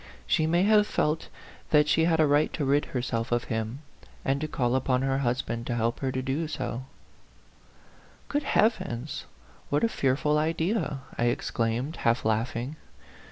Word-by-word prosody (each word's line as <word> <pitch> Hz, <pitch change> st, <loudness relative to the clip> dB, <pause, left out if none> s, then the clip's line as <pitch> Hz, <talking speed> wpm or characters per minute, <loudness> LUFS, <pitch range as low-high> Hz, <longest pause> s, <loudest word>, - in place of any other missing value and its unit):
She 155 Hz, -, +2 dB
may 170 Hz, +3 st, +3 dB
have 210 Hz, 0 st, +5 dB
felt 155 Hz, +1 st, 0 dB, 0.4 s
that 150 Hz, -1 st, +5 dB
she 160 Hz, +1 st, +3 dB
had 165 Hz, -1 st, +2 dB
a 155 Hz, -, +6 dB
right 145 Hz, +1 st, +3 dB
to 150 Hz, -, -1 dB
rid 140 Hz, +2 st, +2 dB
herself 120 Hz, -2 st, -2 dB
of 120 Hz, 0 st, +2 dB
him, 110 Hz, +6 st, -3 dB, 0.4 s
and 135 Hz, +1 st, +1 dB
to 155 Hz, -, -1 dB
call 125 Hz, -4 st, 0 dB
upon 130 Hz, 0 st, +1 dB
her 135 Hz, 0 st, +1 dB
husband 120 Hz, -2 st, -1 dB
to 120 Hz, -, -1 dB
help 115 Hz, 0 st, 0 dB
her 135 Hz, -1 st, -1 dB
to 130 Hz, 0 st, -2 dB
do 140 Hz, +5 st, -1 dB
so," 130 Hz, -4 st, -4 dB, 0.8 s
" -, -, -28 dB
Good 290 Hz, -, 0 dB
heavens! 155 Hz, -, 0 dB, 0.4 s
What 145 Hz, -, +1 dB
a -, -, +5 dB
fearful 150 Hz, -1 st, +1 dB
idea 160 Hz, -1 st, 0 dB
!" -, -, -17 dB
I 120 Hz, -, +3 dB
exclaimed, 120 Hz, +4 st, -1 dB
half 115 Hz, 0 st, +1 dB
laughing. 115 Hz, +6 st, -1 dB
135 Hz, 170 wpm, -27 LUFS, 120-155 Hz, 0.8 s, a